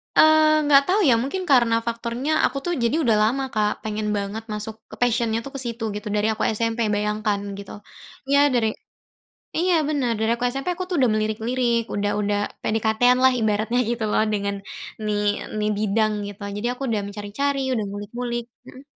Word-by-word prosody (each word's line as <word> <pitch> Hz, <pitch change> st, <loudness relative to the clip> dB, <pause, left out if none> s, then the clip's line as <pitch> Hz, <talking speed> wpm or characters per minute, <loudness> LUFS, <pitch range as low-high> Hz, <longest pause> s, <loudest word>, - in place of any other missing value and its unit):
Eee, 310 Hz, 0 st, +6 dB
enggak 285 Hz, -1 st, +6 dB
tahu 385 Hz, +3 st, +3 dB
ya, -, -, +6 dB
mungkin 325 Hz, +9 st, -3 dB
karena 235 Hz, -3 st, +5 dB
faktornya 235 Hz, +5 st, -2 dB
aku -, -, -1 dB
tuh 350 Hz, -, 0 dB
jadi 235 Hz, +6 st, +2 dB
udah 225 Hz, -3 st, +3 dB
lama, 270 Hz, +4 st, -1 dB
Kak, 210 Hz, -1 st, +2 dB
pengen 215 Hz, 0 st, -3 dB
banget 200 Hz, +2 st, -4 dB
masuk 210 Hz, +1 st, -5 dB, 0.3 s
passion-nya 230 Hz, -2 st, +1 dB
tuh 275 Hz, -, -7 dB
ke 275 Hz, -, -3 dB
situ 235 Hz, -1 st, -4 dB
gitu, 210 Hz, +1 st, -6 dB
dari 210 Hz, +1 st, +1 dB
aku 220 Hz, -, -2 dB
SMP, 230 Hz, +1 st, -1 dB, 0.2 s
bayangkan, 210 Hz, 0 st, 0 dB, 0.2 s
gitu. 200 Hz, -1 st, -9 dB, 0.6 s
Iya, 280 Hz, -, +5 dB
dari 230 Hz, -3 st, +2 dB, 0.9 s
iya, 360 Hz, +2 st, +2 dB, 0.2 s
bener, 275 Hz, -6 st, 0 dB
dari 220 Hz, +1 st, +1 dB
aku 235 Hz, +1 st, -4 dB
SMP 275 Hz, +5 st, -3 dB
aku 370 Hz, +1 st, -4 dB
tuh 360 Hz, -, -1 dB
udah 250 Hz, -, +4 dB
melirik-lirik, 230 Hz, +3 st, 0 dB
udah 205 Hz, 0 st, 0 dB
udah 205 Hz, 0 st, 0 dB, 0.2 s
PDKT-an 225 Hz, +3 st, +2 dB
lah 260 Hz, -, +7 dB
ibaratnya, 220 Hz, +3 st, +1 dB
gitu 235 Hz, -1 st, -2 dB
loh, -, -, +3 dB
dengan 200 Hz, -1 st, -1 dB, 0.5 s
nih 210 Hz, -1 st, 0 dB, 0.4 s
nih 210 Hz, 0 st, 0 dB
bidang, 215 Hz, +1 st, +1 dB, 0.2 s
gitu. 205 Hz, 0 st, -10 dB, 0.2 s
Jadi 215 Hz, +3 st, -2 dB
aku 250 Hz, -, -15 dB
udah 215 Hz, -3 st, 0 dB
mencari-cari, 210 Hz, +8 st, -2 dB
udah 220 Hz, -, -1 dB
ngulik-ngulik 235 Hz, +4 st, -4 dB, 0.2 s
mhm? 260 Hz, -, -12 dB
230 Hz, 175 wpm, -23 LUFS, 210-255 Hz, 0.9 s, lah